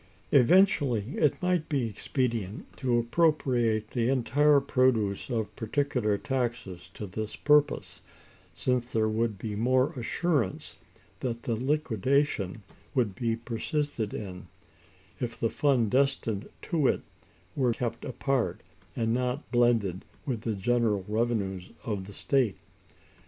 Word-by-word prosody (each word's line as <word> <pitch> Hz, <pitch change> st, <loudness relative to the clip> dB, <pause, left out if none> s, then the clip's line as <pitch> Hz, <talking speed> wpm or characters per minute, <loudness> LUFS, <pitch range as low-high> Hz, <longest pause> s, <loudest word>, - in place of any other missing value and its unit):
Eventually, 140 Hz, -, +4 dB
it 150 Hz, -3 st, +3 dB
might 180 Hz, -3 st, +1 dB
be 135 Hz, -6 st, +1 dB
expedient 115 Hz, -3 st, -3 dB
to 125 Hz, -3 st, +1 dB
appropriate 120 Hz, -5 st, +1 dB
the 120 Hz, -1 st, +1 dB
entire 140 Hz, +3 st, +4 dB
produce 120 Hz, -8 st, +1 dB
of 110 Hz, -4 st, -2 dB
particular 115 Hz, -3 st, 0 dB
taxes 120 Hz, -8 st, -3 dB
to 105 Hz, -, -5 dB
this 105 Hz, +3 st, -5 dB
purpose; 150 Hz, 0 st, +2 dB, 0.5 s
since 120 Hz, +9 st, -1 dB
there 110 Hz, -1 st, +2 dB
would 110 Hz, -1 st, 0 dB
be 105 Hz, +1 st, -4 dB
more 130 Hz, +5 st, +2 dB
assurance 135 Hz, -, -1 dB, 0.4 s
that 120 Hz, -2 st, -3 dB
the 120 Hz, -, -1 dB
liquidation 130 Hz, -, 0 dB, 0.3 s
would 120 Hz, -7 st, +2 dB
be 115 Hz, 0 st, -1 dB
persisted 120 Hz, +1 st, -2 dB
in, 90 Hz, -3 st, -7 dB, 0.7 s
if 115 Hz, -2 st, -4 dB
the 115 Hz, -, 0 dB
fund 130 Hz, -7 st, +2 dB
destined 130 Hz, -6 st, +1 dB
to 155 Hz, -6 st, +1 dB
it -, -, +1 dB, 0.5 s
were 130 Hz, -3 st, +2 dB
kept 115 Hz, -1 st, -3 dB
apart, 135 Hz, -1 st, -1 dB, 0.3 s
and 115 Hz, -1 st, 0 dB
not 125 Hz, +3 st, -2 dB
blended 115 Hz, -7 st, +2 dB, 0.2 s
with 120 Hz, -6 st, -2 dB
the 115 Hz, -2 st, -2 dB
general 105 Hz, -1 st, +1 dB
revenues 105 Hz, -5 st, -1 dB, 0.2 s
of 100 Hz, -4 st, -3 dB
the 100 Hz, -, -10 dB
state. 125 Hz, -3 st, +1 dB
120 Hz, 125 wpm, -28 LUFS, 110-135 Hz, 0.7 s, Eventually